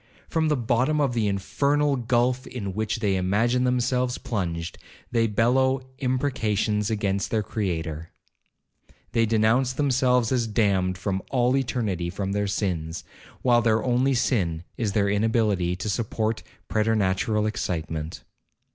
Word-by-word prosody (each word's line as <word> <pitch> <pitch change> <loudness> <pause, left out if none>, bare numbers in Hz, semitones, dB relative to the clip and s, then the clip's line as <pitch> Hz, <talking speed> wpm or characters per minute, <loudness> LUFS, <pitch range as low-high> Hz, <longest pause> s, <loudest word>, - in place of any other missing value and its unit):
From 160 -1 0
the 150 -2 +2
bottom 125 +5 +1
of 140 -4 +1
the 115 -3 +1
infernal 140 +9 +1
gulph 125 +1 +1
in 100 -6 -5
which 110 +2 -2
they 100 -3 +2
imagine 115 +7 +1
themselves 125 0 +1
plunged, 85 -9 -3 0.3
they 115 -2 +2
bellow 130 +5 +2 0.2
imprecations 110 -6 0
against 100 -3 -1
their 110 -2 0
Creator—they 85 +4 -5
denounce 115 +4 +2
themselves 125 -4 +2
as 120 -3 +1
damned 95 -4 +1
from 95 0 -2
all 125 0 +2
eternity 110 -9 -1
for 95 +2 -4
their 100 +1 -1
sins, 90 -5 -2 0.4
while 120 -2 +4
their 110 -1 +2
only 130 +2 +2
sin 85 -10 0
is 110 -4 -2
their 100 -1 +2
inability 105 -4 +1
to 95 +4 -5
support 110 0 -1 0.3
preternatural 105 -1 +1
excitement. 80 -7 -3
110 Hz, 130 wpm, -25 LUFS, 100-125 Hz, 0.4 s, while